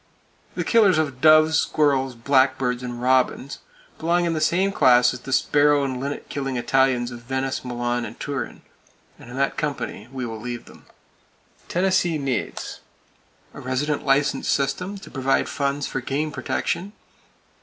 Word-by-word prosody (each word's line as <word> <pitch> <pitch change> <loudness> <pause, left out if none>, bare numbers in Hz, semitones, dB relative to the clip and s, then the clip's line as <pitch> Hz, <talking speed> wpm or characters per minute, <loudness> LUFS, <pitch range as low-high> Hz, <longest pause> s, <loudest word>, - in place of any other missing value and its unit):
The - - -1
killers 210 -7 +4
of 140 -5 -1
doves, 155 +1 +6
squirrels, 135 -4 +1
blackbirds 130 0 +2
and 120 -1 -6
robins 130 +2 +1 0.4
belong 175 +2 +1
in 170 - 0
the 155 - -2
same 185 +5 +2
class 125 -9 +5
as - - -7
the 135 - -9
sparrow 145 +1 +3
and 130 -2 -2
linnet 140 +2 -5
killing 135 -2 -3
Italians 125 0 +1
of 120 - -8
Venice, 130 +2 -3
Milan 120 -1 -2
and 115 0 -8
Turin, 140 -4 -5 0.6
and - - -13
in 125 - -8
that 140 0 0
company 140 -7 -4
we 130 -2 -4
will 110 -2 -6
leave 120 +1 -6
them. - - -17 0.8
Tennessee 180 -2 +1
needs: 135 -5 -3 0.7
A - - -9
resident 135 +4 -1
license 140 0 +1
system 180 +9 -1
to 195 - -12
provide 135 0 +1
funds 140 0 -1
for 135 - -3
game 145 +4 -2
protection. 195 +6 -3
135 Hz, 155 wpm, -23 LUFS, 125-150 Hz, 0.8 s, doves